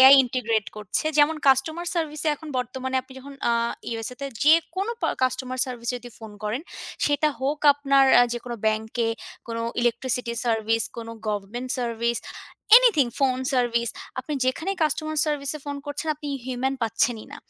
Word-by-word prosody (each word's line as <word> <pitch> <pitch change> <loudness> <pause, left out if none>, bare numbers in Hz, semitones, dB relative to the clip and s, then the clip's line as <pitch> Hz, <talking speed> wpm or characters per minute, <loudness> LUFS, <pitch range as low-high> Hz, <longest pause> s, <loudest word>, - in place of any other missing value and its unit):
AI 265 +1 +11
integrate 230 -5 -1
করছে। 210 +4 -2
যেমন 300 +2 +5
customer 315 +6 +3
সার্ভিসে 310 -2 -1
এখন 310 +1 -11
বর্তমানে 260 +2 -3
আপনি 260 - -16
যখন 280 +2 -11 0.2
আ - - +3 0.4
ইউএসএ 230 +2 -4
তে 280 - -3 0.2
যেকোনো 335 +7 +3
প - - -29 0.2
কাস্টমার 255 0 -1
সার্ভিসে 245 -1 -3
যদি 245 0 -11
ফোন 220 -2 -9
করেন, 220 +8 -2 0.4
সেটা 290 +1 +2
হোক 280 +3 0
আপনার 275 -1 +3 0.3
যেকোনো 240 0 -5
ব্যাংকে, 220 +2 0 0.4
কোনো 230 0 -3 0.2
ইলেকট্রিসিটি 240 0 0
সার্ভিস, 225 -1 +1
কোনো। 230 -1 -6 0.2
Government 210 +5 -3
service, 235 -1 -1 0.6
anything, 460 - +5
phone 260 -2 +2
service, 235 -2 +1 0.3
আপনি 260 +4 -4
যেখানেই 335 +9 -1
কাস্টমার 310 0 0
সার্ভিসে 295 0 -1
ফোন 285 -1 -4
করছেন, 290 +2 -4
আপনি 295 0 -7 0.2
হিউম্যান 260 +1 -1
পাচ্ছেন 225 +1 +1
ই - - -14
না। - - -8
255 Hz, 155 wpm, -25 LUFS, 235-290 Hz, 0.6 s, AI